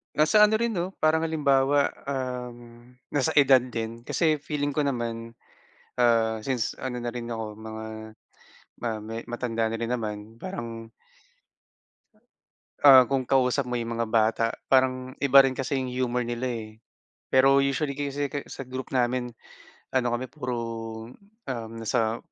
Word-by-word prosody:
Nasa 155 Hz, +8 st, +4 dB
ano 215 Hz, -, +1 dB
rin 235 Hz, +1 st, 0 dB
'no, 185 Hz, -1 st, -3 dB
parang 160 Hz, +1 st, +3 dB
halimbawa, 140 Hz, -2 st, +2 dB, 0.2 s
um, 125 Hz, -3 st, -5 dB, 0.2 s
nasa 145 Hz, +2 st, 0 dB
edad 135 Hz, -2 st, +7 dB
din. 115 Hz, -2 st, -5 dB
Kasi 155 Hz, -3 st, +1 dB
feeling 145 Hz, 0 st, -2 dB
ko 145 Hz, -, -2 dB
naman, 115 Hz, -4 st, -2 dB, 0.7 s
ah, 115 Hz, -2 st, +3 dB
since 125 Hz, 0 st, -1 dB
ano 130 Hz, -2 st, -4 dB
na 120 Hz, -1 st, -4 dB
rin 120 Hz, -1 st, -6 dB
ako 115 Hz, -2 st, -4 dB
mga, 110 Hz, 0 st, -7 dB, 1.0 s
ah, 115 Hz, -2 st, -2 dB
me 115 Hz, +2 st, -6 dB
matanda 115 Hz, -2 st, -1 dB
na 115 Hz, -, -3 dB
rin 115 Hz, +2 st, -1 dB
naman 110 Hz, -3 st, -3 dB, 0.2 s
parang 115 Hz, -11 st, -6 dB, 1.9 s
ah, 130 Hz, -3 st, +9 dB
kung 135 Hz, 0 st, 0 dB
kausap 130 Hz, +1 st, +2 dB
mo 125 Hz, 0 st, -1 dB
yung 115 Hz, 0 st, -3 dB
mga 115 Hz, 0 st, -1 dB
bata 110 Hz, 0 st, +2 dB, 0.2 s
parang 130 Hz, 0 st, +2 dB
iba 140 Hz, 0 st, +7 dB
rin 135 Hz, -1 st, +4 dB
kasi 135 Hz, +1 st, -1 dB
yung 130 Hz, -, -3 dB
humor 125 Hz, -1 st, -1 dB
nila, 120 Hz, +2 st, -2 dB
eh. 115 Hz, -2 st, -5 dB, 0.6 s
Pero 135 Hz, +1 st, +5 dB
usually 140 Hz, +1 st, 0 dB
kasi 140 Hz, 0 st, -3 dB
kasi 145 Hz, -, -5 dB
sa -, -, -7 dB
group 130 Hz, 0 st, -6 dB
namin 125 Hz, -1 st, 0 dB, 0.6 s
ano 125 Hz, -2 st, +2 dB
kami 120 Hz, +2 st, -2 dB
puro, 125 Hz, -2 st, -4 dB, 0.9 s
um, 115 Hz, -4 st, -4 dB
nasa 115 Hz, 0 st, 0 dB
125 Hz, 150 wpm, -26 LUFS, 115-140 Hz, 1.9 s, ah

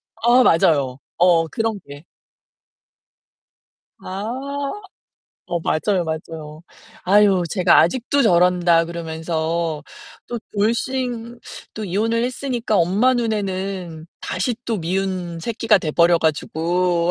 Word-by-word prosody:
아 240 Hz, +3 st, +4 dB
맞아요. 140 Hz, -, +2 dB, 0.2 s
어 170 Hz, -2 st, +4 dB
그런 225 Hz, +3 st, -2 dB
게. 145 Hz, +1 st, -11 dB, 2.0 s
아. 265 Hz, +9 st, -4 dB, 0.8 s
어 175 Hz, -, -2 dB
맞아요, 180 Hz, +3 st, 0 dB
맞아요. 160 Hz, -1 st, -6 dB, 0.4 s
"아유 195 Hz, -1 st, +4 dB
쟤가 185 Hz, -3 st, +4 dB
아직도 260 Hz, -, +1 dB
저런다."그러면서 170 Hz, -, +1 dB, 0.5 s
또 240 Hz, -, -3 dB, 0.2 s
돌싱 235 Hz, +2 st, -1 dB, 0.4 s
또 215 Hz, -, -5 dB
이혼을 220 Hz, +5 st, 0 dB
했으니까 245 Hz, -3 st, -2 dB
엄마 200 Hz, +9 st, +3 dB
눈에는 195 Hz, -7 st, -3 dB
다시 200 Hz, +7 st, -2 dB
또 230 Hz, -4 st, -2 dB
미운 180 Hz, -1 st, -3 dB
새끼가 225 Hz, +1 st, +2 dB
돼 160 Hz, -4 st, -3 dB
버려 170 Hz, +2 st, +4 dB
가지고. 170 Hz, +3 st, 0 dB
185 Hz, 210 characters per minute, -21 LUFS, 165-225 Hz, 2.0 s, 아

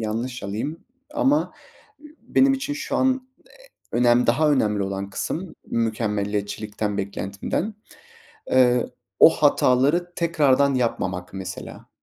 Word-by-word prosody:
yanlış 115 Hz, +3 st, -3 dB
alayım. 110 Hz, +11 st, -4 dB, 0.3 s
Ama 295 Hz, 0 st, +2 dB, 0.7 s
benim 270 Hz, +1 st, +3 dB
için 270 Hz, +2 st, -2 dB
şu 310 Hz, -, -3 dB
an 260 Hz, 0 st, +1 dB, 0.6 s
e -, -, -1 dB
önem, 120 Hz, 0 st, +4 dB
daha 150 Hz, +6 st, +3 dB
önemli 105 Hz, -7 st, +1 dB
olan 100 Hz, 0 st, -4 dB
kısım 165 Hz, -, -4 dB
mükemmeliyetçilikten 105 Hz, -2 st, -2 dB
beklentimden. 100 Hz, -, -3 dB, 0.8 s
Eee, 125 Hz, -1 st, +4 dB, 0.3 s
o -, -, +10 dB
hataları 145 Hz, +8 st, +2 dB
tekrardan 140 Hz, -5 st, +2 dB
yapmamak 95 Hz, -7 st, -2 dB
mesela. 95 Hz, -1 st, -8 dB
120 Hz, 105 wpm, -23 LUFS, 105-160 Hz, 0.8 s, o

